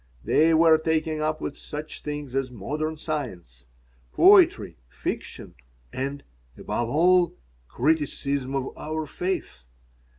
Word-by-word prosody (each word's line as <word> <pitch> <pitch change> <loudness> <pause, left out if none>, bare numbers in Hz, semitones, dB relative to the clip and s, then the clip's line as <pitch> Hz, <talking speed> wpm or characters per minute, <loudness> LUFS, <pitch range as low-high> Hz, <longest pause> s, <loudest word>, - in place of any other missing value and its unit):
They 160 +2 +3
were 160 -1 +6
taken 160 -1 -1
up 155 0 -1
with 140 - -4
such 150 +1 -7
things 145 -3 -6
as 135 -1 -1
modern 150 +8 -4
science, 95 - -6 0.4
poetry, 335 - +5
fiction, - - -6 0.4
and, 140 +2 -4 0.3
above 120 -1 -3
all, 175 +5 +3 0.3
criticism 140 - -1
of 135 -1 -3
our 155 0 -4
faith. 180 - -4
150 Hz, 110 wpm, -25 LUFS, 130-160 Hz, 0.4 s, were